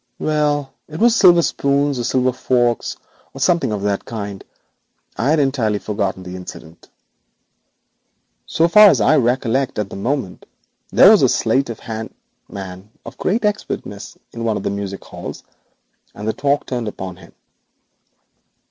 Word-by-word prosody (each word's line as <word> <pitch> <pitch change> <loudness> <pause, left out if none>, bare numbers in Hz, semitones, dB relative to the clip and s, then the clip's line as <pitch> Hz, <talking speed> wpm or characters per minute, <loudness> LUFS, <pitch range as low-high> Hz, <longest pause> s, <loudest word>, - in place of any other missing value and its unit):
'Well, 145 -3 0
it 155 +1 -8
was 235 0 +4
silver 175 -6 +6
spoons 140 -2 0
or - - -2
silver 130 +1 +1
forks, 120 -2 0 0.4
or - - -8
something 170 -9 +2
of 105 -2 -3
that 100 -1 -1
kind. 100 -3 -6 0.7
I 125 - 0
had 160 - +3
entirely 130 -7 +1
forgotten 100 -3 -3
the 90 0 -8
incident. 85 -2 -11 1.6
So 165 - +2
far 210 +4 +8
as 135 - +3
I 135 +9 +4
recollect 130 +1 0
at 105 -2 -3
the - - -7
moment 105 -1 -3 0.4
there - - +7
was - - +5
a - - +4
sleight 135 -1 +1
of 115 - -7
hand 110 -1 -6 0.3
man 95 0 -8 0.2
of - - -11
great 215 +4 0
expertness 205 - -4
in 115 - -6
one 110 -2 0
of - - -6
the - - -1
music 100 -1 -5
halls, - - -8 0.7
and 105 +1 -6
the 110 - 0
talk 140 0 0
turned 120 -3 -3
upon 95 -3 -6
him. - - -16
120 Hz, 155 wpm, -19 LUFS, 100-145 Hz, 1.6 s, far